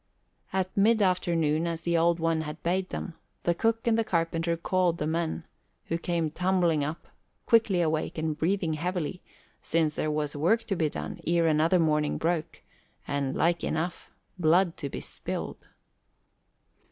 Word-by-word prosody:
At 190 -1 -1
mid 220 +3 +4
afternoon, 170 -4 +1
as 165 -1 -3
the 170 0 +1
Old 170 +1 +3
One 165 -1 +1
had 150 +1 -7
bade 185 +2 0
them, 170 - -5 0.3
the 175 - +2
cook 225 +5 0
and 230 -1 +3
the - - +3
carpenter 165 -2 0
called 180 0 +1
the 150 - -2
men, 165 +1 -2 0.4
who 165 - 0
came 170 -3 -1
tumbling 175 -3 +2
up, 155 +4 -4 0.4
quickly 220 -6 +4
awake 160 -1 -1
and 160 -1 -1
breathing 165 +1 0
heavily, 175 +1 -3 0.4
since 160 -2 +1
there 155 - -1
was 150 -1 -1
work 180 +11 +2
to 195 - -2
be 160 -3 +1
done - - -6
ere 170 0 +3
another 160 +3 +3
morning 150 -3 +2
broke, 165 -1 -2 0.4
and, 140 -1 -1
like 170 +1 +1
enough, 170 +3 -2 0.3
blood 170 +2 +3
to 140 - -4
be - - -6
spilled. - - -5
170 Hz, 160 wpm, -28 LUFS, 155-180 Hz, 0.4 s, mid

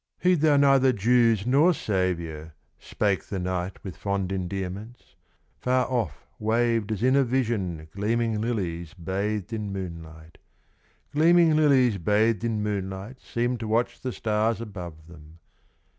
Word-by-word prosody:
"Heed 180 -4 +2
thou 150 -2 +4
neither 135 -2 +5
Jews 115 -1 +3
nor 150 +8 +4
Savior," 85 - -2 0.2
Spake 100 -2 -1
the 100 - -5
knight 90 0 -3
with 95 -4 -7
fond 100 -2 -2
endearments; 95 +4 -5 0.4
Far 125 0 +1
off 110 - -3
waved 115 0 +1
as 110 +1 -2
in 130 +1 +4
a 140 - +5
vision 110 -11 -1
Gleaming 110 +2 -1
lilies 90 -7 -3
bathed 100 +4 -3
in 105 -2 -3
moonlight. 80 -4 -8 0.7
Gleaming 165 +1 +5
lilies 130 -8 +4
bathed 105 +4 +2
in 110 -3 -1
moonlight 100 +3 -4
Seemed 120 +1 -2
to 110 - -4
watch 115 +3 0
the 130 - -3
stars 110 0 0
above 90 -8 -8
them. 80 -1 -15
105 Hz, 135 wpm, -26 LUFS, 95-120 Hz, 0.7 s, neither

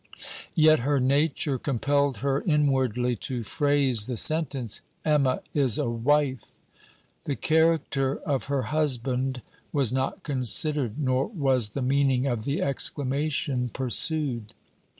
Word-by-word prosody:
Yet 155 -2 +5
her 140 +3 +1
nature 140 +1 +1
compelled 140 0 0
her 140 0 +1
inwardly 130 - +1
to 120 +2 -2
phrase 140 -4 +1
the 125 -3 -3
sentence: 140 -6 +1 0.2
'Emma 145 -4 +2
is 135 -7 +2
a 120 - -1
wife!' 135 +3 0 0.8
The 140 - -2
character 155 -4 +1
of 140 -3 -2
her 140 -2 -1
husband 130 -3 -1 0.3
was 135 -5 +1
not 130 0 -2
considered, 135 -1 0
nor 130 -2 0
was 135 - 0
the 135 - -1
meaning 135 -1 +1
of 120 -5 -2
the 140 +1 -1
exclamation 140 -1 0
pursued. 130 -3 0
135 Hz, 120 wpm, -26 LUFS, 125-145 Hz, 0.8 s, Yet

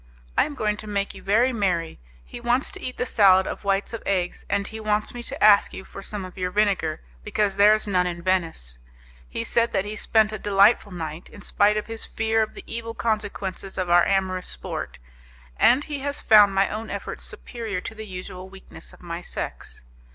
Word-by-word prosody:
I - - +4
am 290 - -7
going 210 -4 0
to 215 - -9
make 200 -1 -2
you - - -11
very 230 +6 +3
merry: 180 -7 -1 0.3
he - - -9
wants 240 +2 +1
to - - -8
eat 255 - -5
the - - -1
salad 190 -5 +5
of - - -5
whites 200 +2 0
of 230 - -5
eggs, 180 -3 -1
and 200 0 0
he 220 +2 -7
wants 215 -1 0
me 240 - -6
to - - -4
ask 210 -1 +6
you 190 - -8
for 195 - -10
some 200 -1 -5
of 185 +1 -11
your 180 0 -1
vinegar, 195 -5 0 0.2
because 205 - 0
there 205 +2 +7
is 215 - -4
none 180 -3 +1
in 175 -1 -5
Venice. 165 - -1 0.5
He - - -3
said 235 0 +1
that 195 0 +1
he 210 +1 -5
spent 215 0 +3
a 215 - -5
delightful 200 +1 +4
night, 165 -1 -6
in 205 - -13
spite 210 +1 +2
of 210 - -2
his 225 -1 -4
fear 225 0 0
of 215 - -2
the - - -9
evil 230 0 -5
consequences 205 -4 -3
of 185 -2 -1
our 175 0 +7
amorous 190 -2 0
sport, - - -5 0.6
and 260 +4 +5
he 295 -2 -5
has 285 +1 -3
found 205 -3 +6
my 195 0 +4
own 220 +1 -5
efforts - - -5
superior 225 -6 -5
to - - -6
the 220 0 -8
usual 185 0 -8
weakness 195 0 -12
of - - -17
my 170 0 -5
sex. 175 - -6
205 Hz, 215 wpm, -24 LUFS, 185-220 Hz, 0.6 s, there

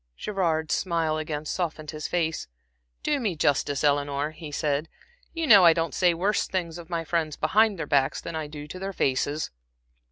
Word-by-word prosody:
Gerard's 165 -6 0
smile 165 -4 0
again 155 -1 -4
softened 160 -3 -3
his 155 -1 -5
face. 165 -2 -1 0.6
"Do 295 -1 +1
me 210 -8 -1
justice, 145 -1 +1
Eleanor," 145 0 +1
he 155 -1 -9
said. 150 +1 -1 0.4
"You 330 -1 -2
know 205 -9 +8
I 170 -1 +8
don't 165 -2 -1
say 175 -2 +3
worse 200 +5 +1
things 175 -3 -3
of 165 - -11
my 170 -2 -2
friends 160 -2 -1
behind 215 -1 +3
their 160 - -3
backs 140 -2 +2
than 170 - -6
I 155 -1 -3
do 150 0 -8
to 185 - -8
their 195 +1 -4
faces." 145 +1 0
160 Hz, 185 wpm, -26 LUFS, 150-180 Hz, 0.6 s, know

